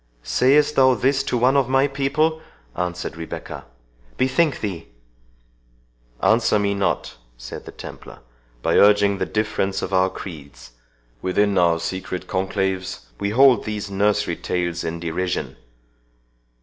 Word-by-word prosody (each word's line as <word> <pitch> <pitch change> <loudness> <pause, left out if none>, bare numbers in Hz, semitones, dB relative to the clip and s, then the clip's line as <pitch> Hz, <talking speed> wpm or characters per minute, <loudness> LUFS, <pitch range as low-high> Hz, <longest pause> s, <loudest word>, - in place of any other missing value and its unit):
"Sayest 145 +3 +3
thou 130 -1 +6
this 135 +2 +1
to 125 - 0
one 130 +3 +3
of 135 -3 +2
my 135 +1 +4
people?" 145 +4 0 0.3
answered 90 -1 -3
Rebecca. 80 0 -7 0.5
"Bethink 135 +4 +2
thee—" 90 -6 -5 1.4
"Answer 115 -1 +3
me 100 -1 +1
not," 100 -9 -2 0.2
said - - -9
the - - -9
Templar, - - -11 0.4
"by - - +2
urging 100 -1 +5
the - - -1
difference 100 -2 -1
of 95 - -4
our 95 0 +3
creeds; 75 -9 -10 0.5
within 100 +2 +1
our 85 -2 +3
secret 95 +1 -4
conclaves 95 - -2
we 100 - -1
hold 130 +3 +5
these 105 -1 -4
nursery 100 +1 +1
tales 85 -1 -2
in 80 +1 -4
derision. 90 +2 -3
100 Hz, 130 wpm, -22 LUFS, 90-130 Hz, 1.4 s, thou